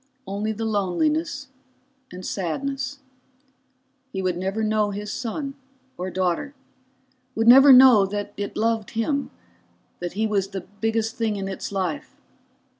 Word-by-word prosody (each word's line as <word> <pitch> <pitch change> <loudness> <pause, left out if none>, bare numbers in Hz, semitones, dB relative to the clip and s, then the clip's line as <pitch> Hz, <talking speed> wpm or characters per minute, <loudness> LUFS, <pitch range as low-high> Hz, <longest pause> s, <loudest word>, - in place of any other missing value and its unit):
Only 205 +2 -2
the 220 +1 -4
loneliness, 285 - -1 0.6
and 180 0 -8
sadness. 270 - -3 1.1
He 190 -1 -3
would 180 -1 0
never 190 +5 -2
know 215 -1 +1
his 205 +1 -5
son, 275 +4 -4 0.4
or 185 +1 -4
daughter, 185 +10 -1 0.8
would 225 +1 0
never 270 +3 +9
know 250 -6 +8
that 205 +1 -4
it 200 0 -5
loved 225 -1 0
him, 280 +5 0 0.7
that 175 -1 -4
he 215 +3 0
was 200 -3 0
the 195 -1 -6
biggest 225 +4 -2
thing 225 -2 0
in 195 -1 -4
its 195 +1 -5
life. 185 -6 -3
215 Hz, 135 wpm, -24 LUFS, 195-250 Hz, 1.1 s, never